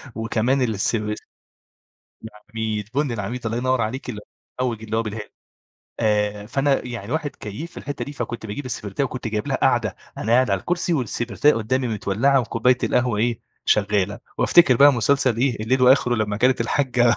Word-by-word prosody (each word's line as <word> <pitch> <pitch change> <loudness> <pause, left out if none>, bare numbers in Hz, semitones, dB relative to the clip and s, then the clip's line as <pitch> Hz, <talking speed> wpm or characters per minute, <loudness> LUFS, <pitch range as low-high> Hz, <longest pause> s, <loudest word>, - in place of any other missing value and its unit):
وكمان 115 +4 0
الس 110 -2 +1 1.3
العميد، 110 -1 -5
بُن 145 -3 0
العميد 115 +3 -4
الله 115 +1 -1
ينور 130 0 +1
عليكِ 125 +4 -3
المحوج 115 +2 -6
اللي 110 0 -3
هو 115 - +2
بالهيل. 105 -1 -6 0.7
آآ، 105 -2 0
فأنا 135 +3 +1
يعني 120 0 -6
واحد 155 -2 -1
كيّيف 110 - -7
في - - -20
الحتة 145 - -5
دي 145 - -8
فكنت 120 -5 -5
باجيب 120 +7 -5
السبرتاية 115 +1 -3
وكنت 125 -2 -4
جايب 105 -1 -3
لها - - +1
قاعدة - - +1 0.2
أنا 110 - -1
قاعد 125 0 +4
على 100 -2 +1
الكرسي 175 0 -1
والسبرتاية 125 +1 +1
قدامي 125 +3 -1
متولّعة 115 +6 +2
وكوباية 120 +1 +1
القهوة 120 -4 +1
إيه 115 0 0 0.2
شغالة، 105 -1 +1 0.2
وأفتكر 150 -8 +5
بقى 145 +3 +7
مسلسل 130 0 +2
إيه 120 -3 0
الليل 130 +3 +1
وآخره، 125 -1 +5
لما 105 -2 -1
كانت 125 +2 +2
الحاجَّة 120 -1 +2
120 Hz, 165 wpm, -22 LUFS, 110-130 Hz, 1.3 s, بقى